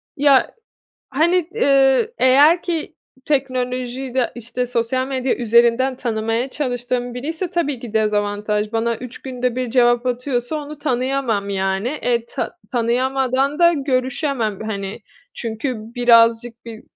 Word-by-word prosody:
Ya, 280 Hz, -2 st, +4 dB, 0.6 s
hani, 335 Hz, +4 st, +2 dB
ııı, 275 Hz, -, +3 dB
eğer 290 Hz, +7 st, +5 dB
ki 335 Hz, -3 st, -3 dB, 0.3 s
teknolojiyi 255 Hz, -2 st, -2 dB
de, 255 Hz, -2 st, 0 dB
işte, 245 Hz, +1 st, -4 dB
sosyal 245 Hz, +2 st, -1 dB
medya 260 Hz, -1 st, -1 dB
üzerinden 240 Hz, +2 st, +3 dB
tanımaya 225 Hz, +1 st, -2 dB
çalıştığım 245 Hz, -3 st, -3 dB
biriyse 320 Hz, +8 st, -4 dB
tabii 300 Hz, -8 st, -1 dB
ki 235 Hz, -3 st, -8 dB
dezavantaj. 210 Hz, 0 st, 0 dB
Bana 230 Hz, +1 st, 0 dB
3 250 Hz, +1 st, -8 dB
günde 250 Hz, -2 st, -2 dB
bir 255 Hz, -2 st, -2 dB
cevap 240 Hz, 0 st, +3 dB
atıyorsa 250 Hz, +2 st, -2 dB
onu 300 Hz, 0 st, -7 dB
tanıyamam, 255 Hz, -6 st, -1 dB
yani. 195 Hz, +2 st, -1 dB
E, 245 Hz, -5 st, -1 dB
tanı -, -, -4 dB, 0.2 s
tanıyamadan 260 Hz, +3 st, 0 dB
da 340 Hz, 0 st, +6 dB
görüşemem, 260 Hz, -, -1 dB
hani. 200 Hz, 0 st, -5 dB, 0.3 s
Çünkü 230 Hz, +3 st, -3 dB, 0.2 s
birazcık 235 Hz, -1 st, +3 dB
bir, 225 Hz, -1 st, -9 dB
250 Hz, 125 wpm, -20 LUFS, 230-270 Hz, 0.6 s, da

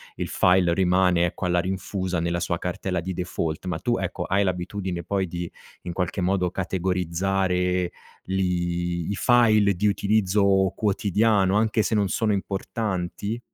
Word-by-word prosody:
il -, -, -3 dB
file 90 Hz, -2 st, +3 dB
rimane, 90 Hz, -1 st, +3 dB
ecco, 85 Hz, -, -5 dB
alla 90 Hz, 0 st, +2 dB
rinfusa 95 Hz, 0 st, -2 dB
nella 85 Hz, +1 st, -1 dB
sua 85 Hz, 0 st, -1 dB
cartella 90 Hz, 0 st, -2 dB
di 95 Hz, +3 st, -4 dB
default, 85 Hz, -2 st, -3 dB
ma 90 Hz, -, -2 dB
tu, 120 Hz, -1 st, 0 dB
ecco, 95 Hz, -1 st, -3 dB
hai 100 Hz, +2 st, +2 dB
l'abitudine 90 Hz, 0 st, -3 dB
poi, 95 Hz, -2 st, -1 dB
di 85 Hz, 0 st, -5 dB, 0.3 s
in 90 Hz, -, -5 dB
qualche 90 Hz, +1 st, -2 dB
modo, 90 Hz, -1 st, +1 dB
categorizzare, 90 Hz, 0 st, 0 dB, 0.4 s
li 85 Hz, -2 st, -1 dB
i -, -, -1 dB
file 110 Hz, -5 st, +4 dB
di 100 Hz, +4 st, -1 dB
utilizzo 105 Hz, +1 st, +2 dB, 0.5 s
quotidiano, 105 Hz, -1 st, +2 dB
anche 110 Hz, 0 st, +2 dB
se -, -, -1 dB
non 105 Hz, -2 st, +2 dB
sono 110 Hz, +2 st, 0 dB
importanti? 100 Hz, +1 st, -3 dB
95 Hz, 145 wpm, -24 LUFS, 90-100 Hz, 0.5 s, file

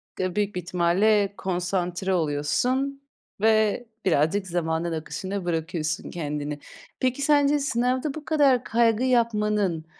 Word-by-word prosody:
Ga 185 Hz, 0 st, -2 dB
büyük 205 Hz, -2 st, -1 dB
bir 180 Hz, -, -2 dB
ihtimalle 190 Hz, +4 st, +2 dB
konsantre 180 Hz, 0 st, -2 dB
oluyorsun 185 Hz, -, 0 dB, 0.4 s
ve 220 Hz, +1 st, +3 dB, 0.2 s
birazcık 185 Hz, +4 st, +2 dB
zamanın 170 Hz, -1 st, -1 dB
akışına 185 Hz, +4 st, -4 dB
bırakıyorsun 165 Hz, -2 st, -2 dB
kendini. 150 Hz, -2 st, -4 dB, 0.4 s
Peki, 255 Hz, +2 st, 0 dB
sence 290 Hz, 0 st, +3 dB
sınavda 255 Hz, +1 st, 0 dB
bu 305 Hz, 0 st, -8 dB
kadar 280 Hz, -6 st, +3 dB
kaygı 230 Hz, 0 st, +2 dB
yapmanın 210 Hz, -8 st, +1 dB
195 Hz, 115 wpm, -25 LUFS, 170-245 Hz, 0.4 s, ve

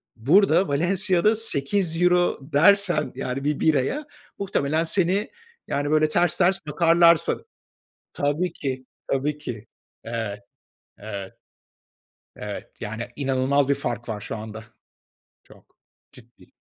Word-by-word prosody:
Burada 185 Hz, -, +4 dB
Valensiya'da 180 Hz, +6 st, +2 dB
€8 180 Hz, -2 st, +1 dB
dersen 175 Hz, -1 st, +4 dB
yani 130 Hz, +2 st, -4 dB
1 150 Hz, 0 st, -1 dB
biraya, 160 Hz, -, +1 dB, 0.3 s
muhtelemen 160 Hz, -5 st, 0 dB
seni, 190 Hz, +4 st, 0 dB, 0.4 s
yani, 145 Hz, +1 st, -1 dB
böyle 155 Hz, 0 st, +3 dB
ters 175 Hz, +1 st, +1 dB
ters 190 Hz, +1 st, +3 dB
bakarlar 170 Hz, +2 st, +5 dB
sana. -, -, -2 dB, 0.7 s
Tabii 145 Hz, +5 st, -1 dB
ki. 130 Hz, -2 st, -4 dB, 0.3 s
Tabii 145 Hz, +2 st, 0 dB
ki. 115 Hz, -6 st, -7 dB, 0.4 s
Evet. 110 Hz, -3 st, -4 dB, 0.6 s
Evet, 100 Hz, -2 st, -7 dB, 1.0 s
evet, 105 Hz, -1 st, -6 dB
yani 110 Hz, +2 st, -5 dB
inanılmaz 135 Hz, 0 st, +1 dB
bir 140 Hz, -, +3 dB
fark 120 Hz, -4 st, -4 dB
var 105 Hz, -2 st, -4 dB
şu 110 Hz, -, -6 dB
anda. 110 Hz, 0 st, -8 dB, 0.8 s
Çok, -, -, -21 dB, 0.4 s
ciddi. -, -, -19 dB
150 Hz, 110 wpm, -24 LUFS, 130-175 Hz, 1.0 s, bakarlar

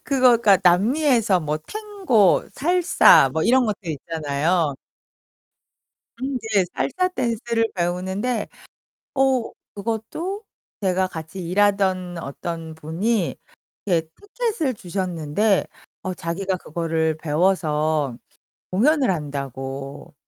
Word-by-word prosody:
그거 260 Hz, -3 st, +4 dB
그러니까 205 Hz, -5 st, +4 dB
남미에서 215 Hz, -, +3 dB
뭐 150 Hz, 0 st, -1 dB
탱고, 365 Hz, -, +1 dB
살사, 345 Hz, -, +5 dB
뭐 160 Hz, -, 0 dB
이런 255 Hz, +5 st, +4 dB
것들 205 Hz, -6 st, -3 dB
있잖아요. 155 Hz, +1 st, -1 dB, 1.4 s
음 260 Hz, +3 st, -3 dB, 0.2 s
네. 195 Hz, -2 st, +5 dB
살사 365 Hz, +6 st, 0 dB
댄스를 230 Hz, -1 st, 0 dB
배우는데 190 Hz, +6 st, -2 dB, 0.7 s
어 265 Hz, -3 st, +2 dB, 0.2 s
그것도 230 Hz, -, -4 dB, 0.4 s
제가 185 Hz, -1 st, +1 dB
같이 160 Hz, +2 st, -8 dB
일하던 190 Hz, -2 st, +1 dB
어떤 160 Hz, +2 st, -6 dB
분이 170 Hz, +6 st, -1 dB, 0.5 s
이렇게 170 Hz, -5 st, +1 dB
티켓을 410 Hz, -, -2 dB
주셨는데 185 Hz, +1 st, 0 dB, 0.4 s
어 185 Hz, -, -3 dB
자기가 185 Hz, +3 st, -3 dB
그거를 160 Hz, -2 st, -1 dB
배워서 155 Hz, -4 st, 0 dB, 0.5 s
공연을 270 Hz, +8 st, +3 dB
한다고. 140 Hz, -3 st, -5 dB
185 Hz, 225 characters per minute, -22 LUFS, 160-235 Hz, 1.4 s, 살사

